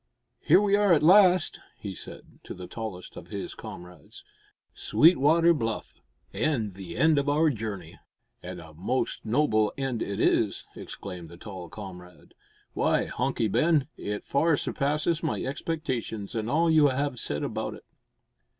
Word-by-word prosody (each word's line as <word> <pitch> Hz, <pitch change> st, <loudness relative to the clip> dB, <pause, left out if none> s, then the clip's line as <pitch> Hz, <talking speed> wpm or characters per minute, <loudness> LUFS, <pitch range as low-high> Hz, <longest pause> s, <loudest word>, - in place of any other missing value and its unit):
"Here -, -, +5 dB
we 200 Hz, -1 st, +3 dB
are 205 Hz, -3 st, +4 dB
at 155 Hz, -, +3 dB
last," 185 Hz, 0 st, +5 dB, 0.2 s
he 100 Hz, -2 st, -6 dB
said, -, -, -11 dB
to -, -, -7 dB
the 90 Hz, -, -8 dB
tallest 95 Hz, -1 st, -7 dB
of -, -, -10 dB
his -, -, -6 dB
comrades; 90 Hz, -3 st, -11 dB, 0.5 s
"Sweetwater 165 Hz, +1 st, +4 dB
Bluff 115 Hz, -7 st, -4 dB, 0.3 s
and 120 Hz, -10 st, 0 dB
the 90 Hz, -2 st, -8 dB
end 155 Hz, +2 st, +4 dB
of 140 Hz, 0 st, -1 dB
our 155 Hz, +2 st, +3 dB
journey!" 105 Hz, -, -6 dB, 0.4 s
"And 90 Hz, 0 st, -7 dB
a 80 Hz, -2 st, -12 dB
most 100 Hz, +11 st, -2 dB
noble 110 Hz, -4 st, +2 dB
end 135 Hz, -4 st, -2 dB
it 100 Hz, +1 st, -3 dB
is!" 110 Hz, -3 st, +1 dB
exclaimed 90 Hz, -4 st, -8 dB
the 85 Hz, -, -12 dB
tall 95 Hz, -3 st, -9 dB
comrade. 90 Hz, -4 st, -11 dB, 0.4 s
"Why, -, -, +1 dB
Hunky 115 Hz, -, -1 dB
Ben, 155 Hz, -, +2 dB
it 105 Hz, 0 st, -5 dB
far 160 Hz, +2 st, +2 dB
surpasses 150 Hz, +5 st, 0 dB
my 160 Hz, -, -2 dB
expectations 130 Hz, -8 st, -3 dB
and 110 Hz, -1 st, -2 dB
all 165 Hz, +5 st, +2 dB
you 155 Hz, -2 st, +6 dB
have 140 Hz, -1 st, -1 dB
said 75 Hz, -7 st, -2 dB
about -, -, -3 dB
it." -, -, -15 dB
120 Hz, 150 wpm, -27 LUFS, 100-155 Hz, 0.5 s, you